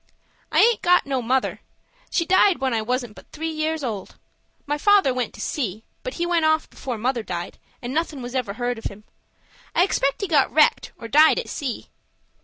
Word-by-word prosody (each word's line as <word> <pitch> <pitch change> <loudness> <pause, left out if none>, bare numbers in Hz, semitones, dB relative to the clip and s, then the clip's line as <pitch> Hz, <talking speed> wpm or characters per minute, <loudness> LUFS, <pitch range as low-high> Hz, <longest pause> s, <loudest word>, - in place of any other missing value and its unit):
"I - - +4
aint 465 -1 +4
got 360 -1 +4
no 270 -2 -1
mother. 255 +2 0 0.5
She 335 - 0
died 375 +1 +4
when 265 -2 -1
I 225 - +1
wasn't 245 0 -2
but - - -16
three 320 +1 -4
years 310 0 -2
old. 215 -7 -5 0.5
My 295 - -1
father 400 -7 +4
went 250 -2 -2
to - - -9
sea; 220 -7 -3 0.2
but - - -6
he 345 - -1
went 345 -2 +1
off 315 0 +2
before 250 -4 -6
mother 245 +2 -1
died, 175 -5 -6 0.2
and 245 +2 -4
nothin' 305 -4 -2
was 245 +1 -7
ever 250 -6 -2
heard 245 +1 -2
of - - -15
him. 205 +2 -6 0.7
I 350 - +5
expect 280 -6 0
he 400 - -1
got 300 -6 +3
wrecked, 305 0 +3
or 230 - -8
died 305 +6 +5
at - - -3
sea." 270 -6 -5
270 Hz, 205 wpm, -23 LUFS, 240-320 Hz, 0.7 s, I